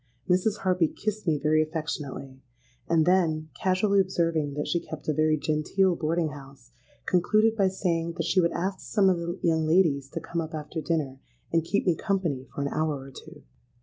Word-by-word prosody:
Mrs. 190 +3 +2
Harpy 180 -3 +2
kissed 215 +3 -4
me 155 -2 +3
very 155 +2 +2
affectionately; 150 -4 -5 0.5
and 160 -2 +3
then, 165 -4 +2
casually 195 +2 +2
observing 165 -6 0
that 150 - -2
she 170 - +1
kept 160 -2 -9
a 155 - +2
very 155 +1 +2
genteel 155 +5 +1
boarding 165 0 0
house, 140 - -13 0.3
concluded 215 +5 +3
by 200 -3 +3
saying 170 -3 -1
that 165 -1 -3
she 185 - +3
would 170 -1 +2
ask 190 +2 -2
some 195 -3 +2
of 180 - +1
the 170 +2 -4
young 160 -2 +2
ladies 155 -6 +3
to 165 - -4
come 170 +1 -3
up 160 0 -6
after 155 +2 -5
dinner 145 -4 -2 0.3
and 165 -1 +2
keep 190 +5 0
me 180 - +4
company 170 -10 -1
for 140 - -2
an 140 - -1
hour 155 -1 -1
or 135 +1 -11
two. - - -13
165 Hz, 190 wpm, -27 LUFS, 155-185 Hz, 0.5 s, me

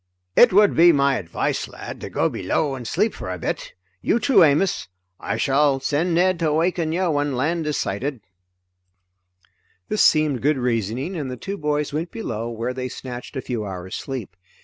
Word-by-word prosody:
"It - - +7
would 205 +2 +5
be 170 +1 +7
my 140 -3 +2
advice, 85 -2 -2
lad, - - -9
to - - -6
go - - +1
below 145 -3 -1
and 125 -3 -6
sleep 205 - +1
for - - -7
a 90 - -4
bit. 80 - -4 0.3
You - - +2
too, 230 -6 +5
Amos. 160 +5 +2 0.3
I - - -3
shall 140 0 +2
send 155 +6 0
Ned 185 0 +3
to 165 -2 +1
awaken 165 +1 +1
you 180 +3 0
when 145 -2 0
land 160 +5 -1
is 150 - -1
sighted." 125 +5 -3 1.7
This 215 - +2
seemed 155 -5 +3
good 150 +1 +2
reasoning, 125 - -1
and 145 -6 -3
the 125 - -5
two 195 +10 -5
boys 150 -4 -1
went 160 +3 -2
below 115 - -4
where 120 +2 -3
they 130 0 -4
snatched 125 +1 -8
a 130 - -2
few 120 -3 -3
hours' 95 -2 -7
sleep. 120 -10 -5
145 Hz, 185 wpm, -22 LUFS, 125-165 Hz, 1.7 s, It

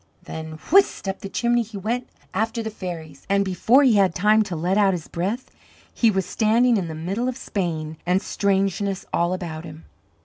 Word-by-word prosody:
Then 160 0 -7 0.2
whist 390 - +4
up 195 0 -2
the 195 - -7
chimney 240 +3 +1
he 220 -2 -7
went 235 +5 -2 0.2
after 225 +3 -1
the 220 - -4
fairies, 165 -8 -8
and 200 0 +3
before 220 +9 +4
he 245 -6 +5
had 190 -4 +3
time 210 +4 +4
to 185 -4 -4
let 175 +4 0
out 200 -2 +4
his 165 - -7
breath 200 +9 -3 0.4
he 230 - +3
was 190 -3 0
standing 230 +5 +3
in 185 -4 -2
the 160 - -6
middle 195 +10 -2
of 255 - -5
Spain, 160 -8 -3
and 180 +2 +2
strangeness 195 -1 0
all 170 +1 +2
about 170 -3 -4
him. 155 -1 -11
195 Hz, 195 wpm, -23 LUFS, 175-220 Hz, 0.4 s, he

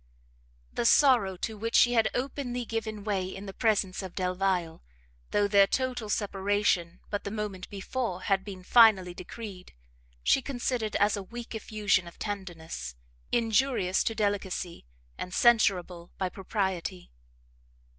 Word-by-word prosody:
The - - -1
sorrow 235 -11 +5
to 220 +4 -4
which 230 +2 -2
she 245 - +6
had 225 -2 +3
openly 250 -2 -3
given 220 -2 -4
way 200 -3 -1
in 195 +1 -7
the 195 - -7
presence 210 -5 +1
of 190 -2 -8
Delvile, 180 -2 -1 0.5
though 205 0 +2
their 200 -1 +6
total 250 -4 -1
separation 200 -4 0
but 205 - -2
the - - -4
moment 205 -3 -5
before 200 -1 -3
had 195 -1 +1
been 190 -2 -8
finally 200 -5 +6
decreed, 185 - -9 0.5
she 270 - +4
considered 245 -4 -2
as 205 +1 +3
a 200 - -4
weak 235 +5 -8
effusion 210 -4 0
of 170 - -12
tenderness, 175 - -6 0.4
injurious 230 -4 +2
to 225 - -1
delicacy, 195 - -2 0.3
and 180 - -5
censurable 185 -7 +3
by 185 -1 -1
propriety. 190 -2 -3
200 Hz, 135 wpm, -29 LUFS, 185-225 Hz, 0.5 s, she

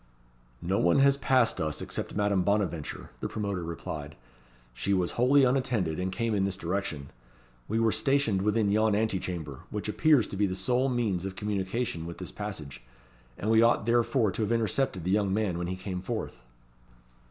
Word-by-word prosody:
"No 95 +3 +1
one 85 - +3
has 140 0 +5
passed 130 -4 +2
us, 75 -1 -2
except - - -4
Madame 100 -2 +2
Bonaventure," 95 -6 -1
the - - -3
promoter 100 -4 -3
replied. 75 -3 -6 0.6
"She 95 +12 0
was 90 -2 0
wholly 135 +4 +4
unattended, 125 -11 +1
and 95 +1 -1
came 115 +2 -1
in 100 -2 +1
this 95 -1 -1
direction. 85 -6 -3 0.6
We 110 +2 0
were 115 -1 +3
stationed 135 -9 +2
within 105 0 +2
yon 110 0 +3
anti 105 -3 +1
chamber, 80 -8 -5
which 105 0 -4
appears 140 +2 +4
to - - -5
be 100 0 +2
the 95 - -3
sole 125 +8 +1
means 110 -8 0
of 95 -1 -5
communication 100 -3 -2
with 85 - -7
this 90 - -7
passage, 80 - -7 0.6
and 110 - -1
we 110 0 +6
ought 115 -2 +3
therefore 120 -2 +2
to 105 - -4
have 105 +1 0
intercepted 115 -4 0
the 90 - -1
young 100 -1 +2
man 100 -4 0
when 85 - -2
he 90 - -3
came 95 -1 -5
forth." 95 - -5
100 Hz, 185 wpm, -28 LUFS, 90-115 Hz, 0.6 s, we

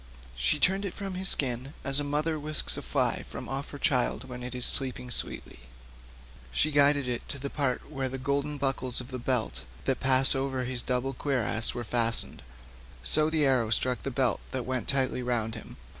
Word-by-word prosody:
She - - +3
turned 190 +6 +2
it 195 - -4
from 195 -2 -5
his 185 +1 +2
skin 130 +1 -1
as 140 +1 +5
a - - -1
mother 150 +2 -1
whisks 150 +1 0
a - - -4
fly - - 0
from - - -8
off 135 +1 -4
her 145 - -8
child 125 -3 +1
when 125 -1 -7
it 125 0 -6
is 125 - +3
sleeping 130 -2 +3
sweetly; - - -3 0.9
she 155 - +1
guided 145 -1 +4
it 120 -1 -4
to - - -4
the 140 +1 -5
part 135 -4 -1
where 135 -3 -3
the 135 - -4
golden 140 +2 -1
buckles 135 -3 -1
of 125 0 -8
the 130 -2 -5
belt 115 - -1 0.2
that 135 - 0
passed 130 +1 +4
over 135 -1 -2
his 125 -1 -1
double 125 +1 -1
cuirass 120 -4 0
were 120 - -3
fastened, 115 0 0 0.6
so 155 - +4
the 160 -2 +2
arrow 125 -5 +2
struck 125 +3 +1
the - - -3
belt 130 -1 0
that 130 -2 -3
went 130 -1 -2
tightly 130 -2 +1
round 120 -3 -1
him. 110 - -9
130 Hz, 200 wpm, -28 LUFS, 125-140 Hz, 0.9 s, as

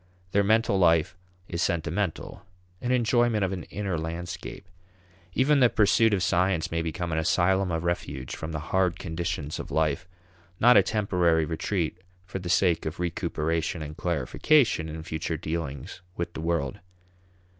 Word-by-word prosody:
Their 100 +1 +3
mental 110 -1 +3
life 85 -2 +3 0.3
is 85 -1 -3
sentimental; 85 +2 -2 0.4
an 125 - -1
enjoyment 120 -3 +2
of 95 - -3
an 90 - -5
inner 95 -5 -3
landscape. 85 +2 -6 0.7
Even 140 +2 +4
the 125 -2 +6
pursuit 115 0 +4
of 95 - -1
science 90 -1 +1
may 85 0 0
become 85 +1 -3
an 80 - +1
asylum 95 +4 +2
of 80 0 -1
refuge 75 -7 -3
from 80 - -6
the 80 - -3 0.2
hard 95 -1 +2
conditions 85 -4 -4
of - - -6
life 80 +3 0 0.5
not 125 +2 +7
a - - +8
temporary 90 -7 +1
retreat 85 +1 -2 0.3
for 95 +1 -5
the 90 -1 -6
sake 90 -2 +2
of 80 +2 -5
recuperation 80 -3 -1
and 75 0 -7
clarification 85 - +2
in 80 0 -6
future 80 -1 -3
dealings 80 +1 -5 0.2
with 85 0 -3
the - - -6
world. 80 -5 -1
85 Hz, 155 wpm, -27 LUFS, 80-95 Hz, 0.7 s, a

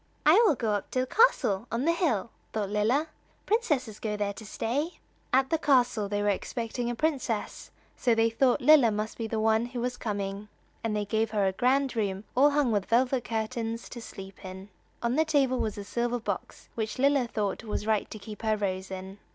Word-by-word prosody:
"I 345 +10 +7
will 310 - +4
go 225 -3 -1
up 205 -1 -2
to 255 - 0
the - - 0
castle 250 - +3
on 235 +4 -1
the 335 - +4
hill," 265 - 0 0.2
thought 205 -2 -2
Lilla; 225 +9 +2 0.4
"princesses 290 - 0
go 210 -1 -2
there 205 -1 -1
to 220 - -10
stay." 285 - -2 0.3
At 265 +1 +3
the 325 - +2
castle 245 -8 +2
they 205 0 -1
were 205 - +2
expecting 235 +4 -2
a 240 - -2
princess, 260 -7 -2 0.3
so 240 -3 +2
they 225 0 +3
thought 250 +2 +2
Lilla 295 -6 +7
must 215 +2 -3
be 225 - -2
the 220 0 -2
one 220 +1 +2
who 245 0 -6
was 245 +1 -2
coming, 200 -2 -4 0.4
and 225 -2 -1
they 210 -1 -1
gave 220 +2 0
her 205 -2 +1
a 190 - +2
grand 260 +5 +1
room, 200 -3 -1
all 275 +3 +6
hung 285 -4 +2
with 205 -3 0
velvet 250 +1 +2
curtains, 225 0 -3
to 240 - -8
sleep 195 -3 -10
in. 190 +1 -9 0.3
On 235 +3 +1
the 315 - +5
table 275 -5 +2
was 215 -2 -2
a 205 - -5
silver 240 +4 -1
box 230 - -5
which 220 0 -3
Lilla 275 -1 +3
thought 205 -4 -2
just 215 -1 -4
right 215 -1 +1
to - - -7
keep 210 +1 -9
her 220 -1 +1
rose 190 -2 -2
in. 190 +1 -7
225 Hz, 210 wpm, -28 LUFS, 210-255 Hz, 0.4 s, I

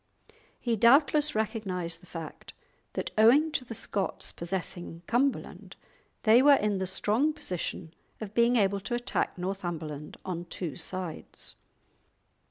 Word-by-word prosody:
He 235 -2 0
doubtless 285 +6 +5
recognised 190 -6 -2
the 180 - -17
fact 165 -2 -8 0.4
that - - -3
owing 280 +9 +6
to 265 - -1
the 235 -2 -7
Scots 200 -2 -3
possessing 175 -1 -5
Cumberland 260 +7 -1 0.5
they 225 +2 +7
were 285 +1 +7
in 210 -5 0
the 190 - -1
strong 220 +10 +1
position 180 - -5 0.3
of 215 -2 -7
being 235 +2 +4
able 200 -3 +2
to 240 +5 -3
attack 240 -4 -1
Northumberland 175 -5 -5
on 175 -2 -4
two 170 -4 -5
sides. 185 -4 -4
200 Hz, 130 wpm, -29 LUFS, 175-240 Hz, 0.5 s, they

